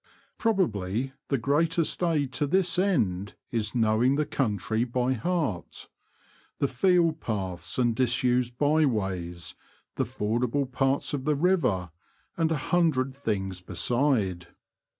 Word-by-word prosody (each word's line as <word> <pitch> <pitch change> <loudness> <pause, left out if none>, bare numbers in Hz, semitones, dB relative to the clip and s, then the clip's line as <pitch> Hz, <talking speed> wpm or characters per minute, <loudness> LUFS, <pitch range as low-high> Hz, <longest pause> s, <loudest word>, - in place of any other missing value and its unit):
Probably 130 - 0
the 140 - +1
greatest 160 +8 +1
aid 150 -6 +1
to 145 - 0
this 180 +2 +2
end 105 - 0 0.2
is 110 -2 -2
knowing 115 +3 +3
the 150 +1 +1
country 110 -3 -1
by 125 +1 0
heart; 130 - -3 0.7
the 140 - +1
field 165 +3 +2
paths 95 -6 -4
and 120 -3 +2
disused 125 0 +1
bye 150 +2 +3
ways, 90 -7 -3 0.4
the - - +1
fordable 120 +6 -1
parts 135 +3 0
of 135 -2 -3
the 150 -1 +2
river, 140 - +1 0.4
and 165 -1 +1
a 160 - +1
hundred 140 -5 +1
things 95 -9 -3
beside. 105 -5 0
130 Hz, 125 wpm, -27 LUFS, 105-150 Hz, 0.7 s, knowing